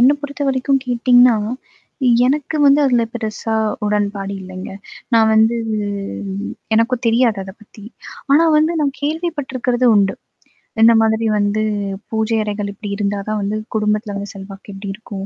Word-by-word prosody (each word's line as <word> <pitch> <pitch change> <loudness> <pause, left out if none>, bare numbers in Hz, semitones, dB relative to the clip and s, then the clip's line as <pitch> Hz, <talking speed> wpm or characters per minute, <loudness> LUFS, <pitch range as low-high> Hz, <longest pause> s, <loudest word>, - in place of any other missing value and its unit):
என்ன 255 +4 +6
பொறுத்தவரைக்கும் 275 -2 -1
கேட்டீங்கன்னா, 245 -1 +4 0.9
எனக்கு 295 +3 -1
வந்து 280 +1 +5
அதுல 245 -3 +2
பெருசா 220 0 -3 0.3
உடன்பாடு 205 -1 -1
இல்லைங்க. 185 0 -8 0.4
நான் 220 -1 +5
வந்து 220 +2 +4 1.2
எனக்கும் 235 +2 +1
தெரியாது 230 -2 +3
அத 190 - -9
பத்தி. 215 0 -16 0.5
ஆனா 320 +4 +5
வந்து 310 +2 +3
நான் 280 -2 +1
கேள்விப்பட்டிருக்கிறது 285 -6 -1
உண்டு. 195 -1 +3 0.7
இந்த 230 +1 +7
மாதிரி 220 0 +1
வந்து 205 +1 0 0.5
பூஜை 220 0 0
அறைகள் 205 -1 -3
இப்படி 205 +1 -8
இருந்தா 200 -1 -1
தான் 215 0 -1
வந்து 205 +2 -2 0.2
குடும்பத்தில 210 0 0
வந்து 200 0 -5
செல்வாக்கு 195 +1 -10
இப்படி 195 +1 -7
இருக்கும். 195 -2 -8
220 Hz, 135 wpm, -18 LUFS, 205-255 Hz, 1.2 s, இந்த